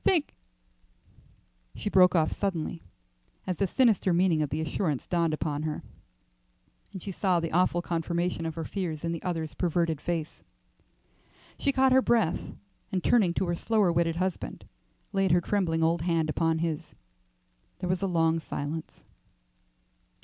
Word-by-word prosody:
Thank 335 -6 +2 0.7
" - - -32
She - - -5
broke 185 -2 +5
off 155 -2 +3
suddenly 175 -4 -2 0.6
as 185 -3 -2
the 195 - +1
sinister 215 -4 +3
meaning 170 -2 +3
of 150 - 0
the 150 +3 -2
assurance 155 -2 -1
dawned 170 -2 +1
upon 150 -1 -2
her 155 -1 -3 1.1
and 190 -4 -8
she 200 - -4
saw 185 -1 +1
the 165 -1 -3
awful 175 0 +2
confirmation 170 0 -1
of 160 - -5
her 165 - -3
fears 170 -6 -4
in 165 - -1
the 165 - -4
other's 160 -6 -3
averted 165 -3 0
face. 165 -1 -3 1.2
She 280 - +2
caught 265 -1 +3
her 260 +1 +6
breath, 225 -10 +1 0.4
and 185 -2 -1
turning 190 -8 +3
to - - +1
her 175 - -1
slower 210 -1 +2
witted 165 -1 +1
husband, 180 - -3 0.5
laid 195 -1 +2
her 175 +1 +4
trembling 165 -4 0
old 165 0 +2
hand 165 -2 +1
upon 165 +1 +1
his. 160 -3 -4 0.8
There 180 - -4
was 185 +1 0
a 195 - +1
long 165 -2 +2
silence. 155 0 -5
170 Hz, 155 wpm, -28 LUFS, 160-185 Hz, 1.2 s, her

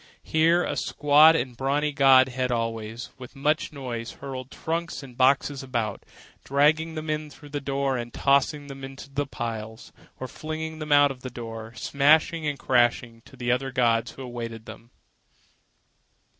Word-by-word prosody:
Here 165 +2 +3
a - - -2
squat 150 +2 +5
and 125 -5 -2
brawny 145 +4 0
god 135 -2 +6
held 130 0 -2 0.2
sway, 110 0 -7 0.2
with 130 +2 -11
much 150 +3 0
noise, 125 -5 -6
hurling 130 -2 -7
trunks 165 -1 -4
and 125 -3 -12
boxes 135 +2 +2
about, 120 -6 -3 0.4
dragging 155 +4 +2
them 155 0 -5
in 155 0 -2
through 145 +1 -14
the 145 0 -4
door 135 -1 -1
and 120 0 -5
tossing 140 +2 +2
them 135 -1 -10
into 135 +1 -9
the 145 0 -2
piles, 115 -3 -6 0.3
or 130 - -4
flinging 155 +2 -6
them 155 -1 -5
out 145 -1 +6
of 130 -2 -10
the 130 - -6
door, 115 -1 -8
smashing 150 +6 +2
and 145 -1 -2
crashing, 120 -2 +1
to 120 -2 -3
other 135 +2 0
gods 120 -2 +1
who 135 - -9
awaited 115 -2 -6
them. 115 - -11
135 Hz, 160 wpm, -25 LUFS, 120-150 Hz, 0.4 s, god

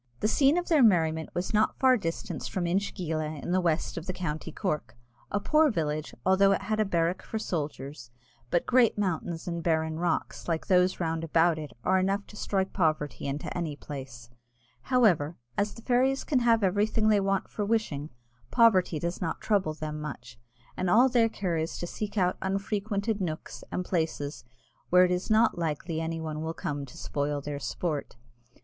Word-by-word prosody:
The - - +2
scene 275 +7 +4
of 355 - -1
their 315 -4 +4
merriment 160 -7 +3
was 180 +4 -2
not 215 +1 +2
far 260 -1 +5
distant 175 -3 -4
from 180 -2 -2
Inchegeela, 165 -4 -2
in - - -3
the 185 +1 +3
west 170 -1 0
of 165 - -11
the 185 - -2
county 155 -4 -4
Cork 150 - -3 0.3
a 205 - 0
poor 305 +8 +4
village, 155 - -2
although 195 +1 +5
it 195 - -2
had 215 +2 -1
a 215 - +3
barrack 170 -2 0
for 220 - -5
soldiers; 145 - -4 0.4
but 175 - +1
great 245 -4 +4
mountains 175 -4 -2
and 170 -1 -2
barren 160 -1 0
rocks, 175 -2 -2
like 165 -2 -1
those 180 0 +3
round 165 -1 -1
about 165 0 +3
it, 150 -5 -7
are 190 +1 +3
enough 195 +2 0
to - - -14
strike 195 -2 -1
poverty 155 -6 0
into 140 +1 -4
any 165 -4 -2
place: 130 -5 -9 0.6
however, 180 - +3 0.2
as 205 +1 -1
the 230 - -12
fairies 260 +2 +2
can 275 -5 +1
have 230 -3 +3
everything 210 +3 +2
they 210 -1 +5
want 195 0 0
for 210 - -4
wishing, 200 -9 -1 0.4
poverty 200 -9 +4
does 170 +3 -3
not 165 - -2
trouble 190 -7 +1
them 150 -1 -5
much, 135 -4 -8 0.4
and 185 0 -1
all 245 +7 +6
their 235 -2 +3
care 185 -6 -2
is 160 +1 -2
to - - -4
seek 210 +4 -5
out 180 -2 +2
unfrequented 200 +2 -1
nooks 160 -4 -5
and 180 - -2
places 160 -5 -2 0.5
where 180 +1 +7
it 180 - 0
is 180 +3 -1
not 220 -4 +3
likely 160 0 -2
any 165 0 -3
one 155 -1 -4
will 160 +1 -3
come 145 -1 -4
to 125 - -13
spoil 145 0 -2
their 145 0 -5
sport. 150 0 -3
180 Hz, 185 wpm, -28 LUFS, 155-205 Hz, 0.6 s, where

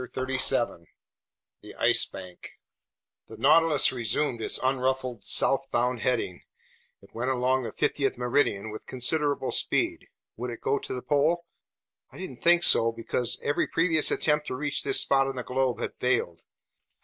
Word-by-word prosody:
CHAPTER 130 0 -3
13 85 -10 0 0.7
The - - -12
Ice - - +4
Bank 90 -2 -11 0.7
THE 110 - -11
NAUTILUS 155 +4 +4
resumed 120 +1 -2
its - - -1
unruffled 130 -3 -1
southbound 125 +2 +1
heading. 110 -7 -1 0.6
It - - -20
went 120 +3 -2
along 130 0 +1
the 120 - -5
50th 135 -4 -1
meridian 120 -4 0
with 110 - -10
considerable 140 +2 0
speed. - - -1 0.3
Would 125 +2 -4
it 115 - -7
go 140 - 0
to - - -7
the 125 - -6
pole? 155 +4 +1 0.7
I - - -14
didn't 160 -10 -8
think 175 0 +4
so, 115 -7 +5
because 115 +1 -2
every 145 - 0
previous 165 -2 +2
attempt 150 -1 +1
to - - -3
reach 145 +2 -2
this - - +2
spot 135 -1 +2
on 135 - -4
the 125 - -4
globe 130 -1 -1
had - - -4
failed. 115 -10 -1
130 Hz, 155 wpm, -27 LUFS, 120-145 Hz, 0.7 s, so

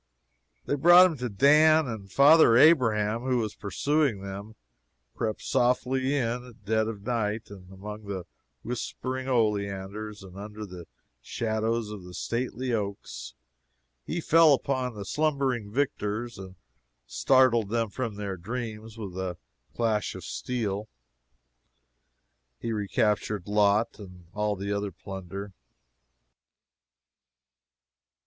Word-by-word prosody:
They - - -1
brought 175 +6 +8
him 170 -5 0
to 125 -1 -3
Dan, 150 +8 +5
and 105 -5 -7
father 140 -3 +7
Abraham, 115 -7 +4
who 130 0 0
was 110 -3 -2
pursuing 115 +2 0
them, 100 +3 -7 0.6
crept 110 -2 -3
softly 130 +2 +1
in 125 -2 -1
at 115 -5 -16
dead 110 +1 +1
of 105 -3 -6
night, 110 -2 -2
among 100 +2 -9
the 95 -3 -5 0.4
whispering 130 +2 -4
oleanders 105 -2 -1
and 95 0 -12
under 105 +1 -7
the 90 -3 -10 0.3
shadows 110 - -2
of 105 -3 -8
the 90 0 -10
stately 125 +1 -2
oaks, 100 -3 -4 0.7
and 170 0 -3
fell 160 -2 +6
upon 130 -3 -2
the 100 -1 -6
slumbering 135 -6 0
victors 120 -4 -2
and 95 -1 -9 0.5
startled 130 -5 +3
them 115 -1 -1
from 115 -4 -3
their 100 -2 -4
dreams 110 +2 -6
with 100 -5 -6
the 90 -1 -4 0.4
clash 110 -3 0
of - - -8
steel. 110 -4 -3 1.7
He 115 - -4
recaptured 105 -2 0
Lot 105 +2 +2
and 90 -3 -12
all 105 0 0
the 100 +1 -3
other 100 0 -2
plunder. 95 +2 -8
110 Hz, 120 wpm, -27 LUFS, 100-125 Hz, 1.7 s, brought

